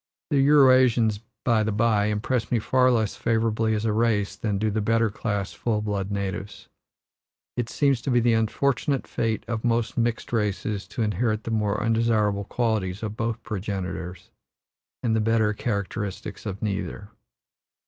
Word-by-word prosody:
The 140 - +4
Eurasians, 130 -6 +5 0.2
by 115 -3 +3
the 110 0 0
by, 105 -1 +2
impress 110 +3 -1
me 120 - +3
far 130 +3 +3
less 110 -4 +1
favorably 110 -1 +1
as 105 +1 -2
a 110 - +1
race 110 -2 +1
than 105 -3 -2
do 110 +1 0
the 110 +1 -1
better 115 +1 +2
class 100 -4 -3
full 105 +6 -1
blood 100 -2 -2
natives. 100 0 -4 0.9
It 120 -2 -2
seems 140 -5 +1
to - - -3
be 120 -1 +4
the 120 0 +3
unfortunate 135 +5 0
fate 110 -1 -2
of 115 -1 -3
most 115 -1 0
mixed 115 0 -1
races 105 -2 -1
to 120 - -3
inherit 110 +1 0
the 115 - -4
more 105 -2 0
undesirable 110 -3 +1
qualities 110 -5 -1
of 105 -1 -3
both 115 -1 -3
progenitors, 95 -3 -5 0.7
and 115 -2 +1
the 110 - +2
better 110 -1 +2
characteristics 100 -1 -4
of 100 +1 -5
neither. 100 0 -3
110 Hz, 160 wpm, -25 LUFS, 105-115 Hz, 0.9 s, Eurasians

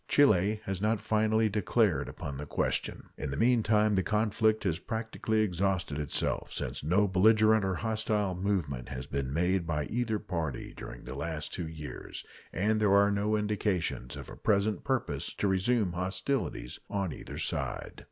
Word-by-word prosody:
Chile 105 -6 +4
has 95 -1 -3
not 110 +1 +2
finally 110 +1 +2
declared 105 - +1
upon 70 -1 -6
the 75 - -6
question. - - -1
In 75 - -3
the 70 - -3
meantime 110 -2 +3
the 95 - +3
conflict 110 +2 +1
has 90 -4 0
practically 110 0 -1
exhausted 90 -5 0
itself, 75 -2 -1
since - - -4
no 95 +7 +3
belligerent 110 +3 +5
or 95 -1 0
hostile 110 -2 0
movement 90 -10 -2
has 65 -1 -5
been 70 -2 -3
made 90 +3 +1
by 75 -3 0
either 115 -2 -1
party 80 -9 -4
during - - -9
the - - -7
last 80 +2 -4
two 85 - -3
years, 75 -5 -7 0.3
and 110 +4 +1
there 105 -2 +4
are 100 0 +5
no 105 +1 +1
indications 105 - -1
of - - -8
a - - -8
present 105 0 +1
purpose 130 -1 -1
to 105 - 0
resume 95 0 +2
hostilities 95 - -2
on 95 -4 -1
either - - -8
side. - - -3
100 Hz, 160 wpm, -30 LUFS, 85-110 Hz, 0.3 s, belligerent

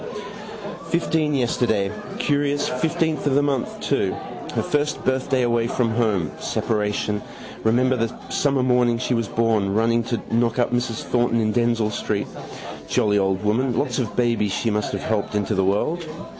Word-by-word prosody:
Fifteen 160 -3 +1
yesterday. 115 -5 +1 0.3
Curious, 145 0 +1
fifteenth 160 +3 0
of 135 - +2
the 145 - +4
month 140 -4 -1
too. - - 0 0.4
Her - - +1
first 150 0 -1
birthday 130 0 +1
away 120 -1 +2
from 120 -1 0
home. 110 -8 +1
Separation. 105 -1 -1 0.4
Remember 125 +3 +3
the 115 -2 0 0.2
summer 140 -3 +1
morning 125 -2 +3
she 120 - -1
was 115 -2 0
born, 110 -4 +1
running 115 +1 +3
to 120 -1 -1
knock 115 0 +2
up 120 -1 +1
Mrs 120 -2 -1
Thornton 120 -1 +1
in 110 -1 +1
Denzille 115 -2 +2
street. - - -1 0.6
Jolly 105 -1 +2
old 95 0 0
woman. 120 +4 +1
Lot 145 - 0
of 120 -5 -2
babies 115 -4 +1
she 115 - 0
must 105 0 -1
have - - -3
helped 105 -1 -1
into 105 +1 0
the 95 -1 +2
world. 155 - 0
120 Hz, 160 wpm, -23 LUFS, 110-130 Hz, 0.6 s, the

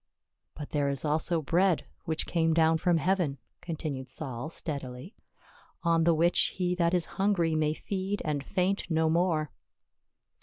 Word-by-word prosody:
" - - -56
But 150 - -7
there 145 -2 +1
is 140 +1 -2
also 155 +2 0
bread 175 +3 +2 0.2
which 160 -1 0
came 165 -2 +1
down 160 0 +4
from 175 0 +3
heaven," 175 -5 +1 0.2
continued 150 -6 -4
Saul 130 -1 -5
steadily, 140 - -5 0.4
" - - -29
on 165 -1 +3
the 170 -1 +4
which 170 +2 +2
he 180 -1 +1
that 175 0 +2
is 175 - +1 0.2
hungry 185 -5 +2
may 155 0 +1
feed 195 +2 -3
and 145 -3 -1
faint 190 +4 -1
no 160 -1 +2
more." 165 -3 +1
160 Hz, 160 wpm, -29 LUFS, 150-180 Hz, 0.4 s, down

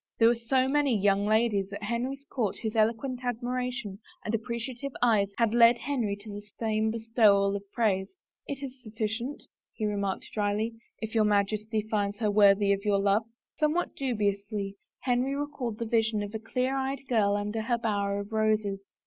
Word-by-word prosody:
There 225 0 +6
were - - +4
so 255 +3 +1
many 280 -4 +2
young 200 0 +2
ladies 215 -3 +2
at 200 - -6
Henry's 250 +6 -3
court 225 -8 -2
whose 220 -1 -4
eloquent 235 +4 +1
admiration 245 -3 -3 0.3
and 210 - -2
appreciative 235 +4 -3
eyes 215 -5 +3
had 230 -2 +2
led 235 0 +7
Henry 240 -6 -1
to 210 0 -9
the 205 - -6 0.2
same 220 -1 +1
bestowal 220 -3 +3
of 200 0 -7
praise! 195 -5 +1 0.2
" - - -44
It 280 0 -5
is 265 -1 -7
sufficient," 225 +4 -4 0.3
he 215 - -3
remarked 200 -2 -1
dryly, 210 +2 0
" - - -44
if 220 - -4
your 220 -2 +4
Majesty 210 +1 +1
finds 205 -2 -1
her 215 -2 +1
worthy 200 -1 +5
of 200 0 -3
your 205 -2 +2
love." 200 +2 +2 0.3
Somewhat 310 +3 0
dubiously 205 -5 -1 0.3
Henry 255 +2 +1
recalled 280 -6 -3
the 230 - -3
vision 220 -2 +1
of 205 +1 -7
a 220 - -3
clear 250 +4 -1
eyed 270 0 -2
girl 205 -4 +3
under 210 +2 -2
her 235 +2 0
bower 200 -3 -1
of 200 +2 -10
roses. 215 -2 +1
220 Hz, 180 wpm, -28 LUFS, 205-245 Hz, 0.3 s, led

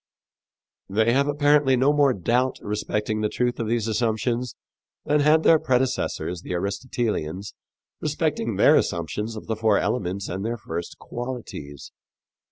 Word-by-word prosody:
They 110 +4 +2
have 140 +2 +2
apparently 145 -2 +3
no 135 +4 +3
more 145 -2 +4
doubt 125 +5 0
respecting 105 +1 -2
the 105 - +1
truth 125 +2 -1
of 115 - -2
these 115 -1 0
assumptions 115 +2 -1 0.5
than 150 +1 +2
had 155 +2 +4
their 160 - +6
predecessors, 125 - -1
the 90 - -5
Aristotelians, 100 -2 -3 0.5
respecting - - -1
their - - +6
assumptions 105 +7 -1
of 110 - -8
the 110 - -2
four 110 -1 +2
elements 95 -3 -1
and 95 +2 -4
their 115 +2 -2
first 85 -4 -6
qualities. 120 - -7
115 Hz, 140 wpm, -24 LUFS, 100-130 Hz, 0.5 s, their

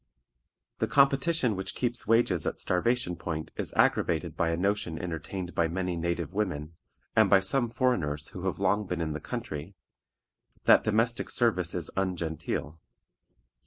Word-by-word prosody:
The 110 - +1
competition 135 0 +3
which 95 0 -4
keeps 120 -3 0
wages 115 -7 +3
at - - -2
starvation 90 0 0
point 80 -1 -5
is - - -3
aggravated - - +2
by 85 - +1
a 85 - 0
notion 95 -3 0
entertained 90 +2 -5
by 85 - +2
many 90 +1 -2
native 85 -1 -2
women, 85 -7 -2 0.4
and - - +5
by 95 - +7
some 120 +6 +2
foreigners 90 - 0
who 95 +1 -5
have 95 - -1
been 100 - -6
long 100 0 +1
in 80 -2 -2
the 75 - -4
country, 75 +5 -6 0.9
that - - +6
domestic 115 +2 +1
service 90 -8 +1
is 85 -3 -3
ungenteel. 85 -4 -3
90 Hz, 150 wpm, -28 LUFS, 85-110 Hz, 0.9 s, by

